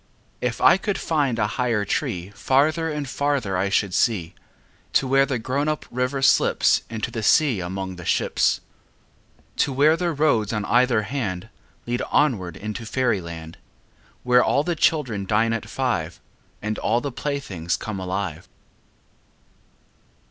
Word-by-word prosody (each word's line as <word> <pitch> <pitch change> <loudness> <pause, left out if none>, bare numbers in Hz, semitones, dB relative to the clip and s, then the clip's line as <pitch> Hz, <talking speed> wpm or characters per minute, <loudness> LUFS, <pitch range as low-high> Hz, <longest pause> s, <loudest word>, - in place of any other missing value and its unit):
If 125 -2 -2
I - - +7
could 200 +1 -2
find 145 -7 0
a 105 - +2 0.2
higher 115 -4 +1
tree 90 -1 -2
Farther 155 +8 +1
and 150 -2 -3
farther 135 -8 -1
I 95 +2 0
should 100 -1 +1
see, 95 -8 +1 0.6
To 135 - +3
where 135 +1 +4
the 135 - -1
grown 130 +6 -1
up 155 0 -2
river 125 +2 -1
slips - - +4
Into 110 -1 -4
the 115 - -4
sea 130 0 +3
among 95 +1 -5
the 90 - -8
ships, - - +1 1.0
To - - +2
where 145 +4 +4
the 175 0 -1
roads 140 -9 +1
on 105 -1 -2
either 120 -2 +3
hand 110 -5 -4 0.4
Lead 120 +1 -2
onward 100 - +1
into 105 +2 -5
fairy 120 -3 0
land, 80 -1 -9 0.6
Where 125 0 +5
all 140 - +2
the 175 +1 -1
children 125 -12 +1
dine 115 +2 +2
at 110 -1 -4
five, 115 -12 -2 0.4
And 110 0 -2
all 115 +2 +1
the 140 +2 -4
playthings 120 - -3
come 105 -3 -5
alive. 95 -3 -4
115 Hz, 150 wpm, -23 LUFS, 100-140 Hz, 1.0 s, I